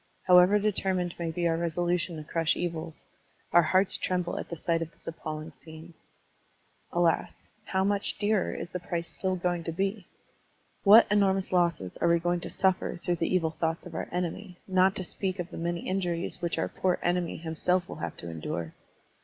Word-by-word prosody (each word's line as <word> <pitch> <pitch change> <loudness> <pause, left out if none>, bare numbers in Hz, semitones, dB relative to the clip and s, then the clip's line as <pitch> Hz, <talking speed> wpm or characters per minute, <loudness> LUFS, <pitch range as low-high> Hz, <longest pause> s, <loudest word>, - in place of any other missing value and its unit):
How 180 -1 +8
ever 185 +4 +5
determined 190 -4 0
may 170 -1 -2
be 170 +1 0
our 165 - +2
resolution 170 +1 -1
to 155 - -6
crush 165 +1 +1
evils, 165 -2 -4 0.5
our 175 - +8
hearts 185 +4 +2
tremble 180 -1 -1
at - - -7
the 170 - -4
sight 165 +1 0
of 165 0 -4
this - - -9
appalling 155 -1 -6
scene. 160 +1 -12 1.0
Alas! 170 -2 0 0.2
How 190 0 0
much 200 +1 0
dearer 205 -1 +1
is 175 - -6
the 180 - -3
price 170 -1 -3
still 185 -1 -1
going 175 -1 -1
to 165 - -3
be? 195 +3 -2 0.8
What 215 +3 +9
enormous 195 -2 +2
losses 170 - +1
are - - +1
we 170 0 +5
going 175 +1 0
to - - -6
suffer 190 -2 +1
through 175 0 -1
the 165 - -1
evil 165 -3 +2
thoughts 165 0 -2
of - - -9
our - - -4
enemy, 180 +2 -4
not 190 +1 +3
to 190 - 0
speak 190 +1 -3
of 180 -1 -5
the - - -7
many 170 0 -2
injuries 180 -2 -2
which 170 -1 -1
our 160 - 0
poor 185 -1 0
enemy 175 -1 0
himself 170 +2 0
will - - -8
have 85 -2 -5
to 85 - -8
endure? 80 0 -4
175 Hz, 195 wpm, -28 LUFS, 165-185 Hz, 1.0 s, What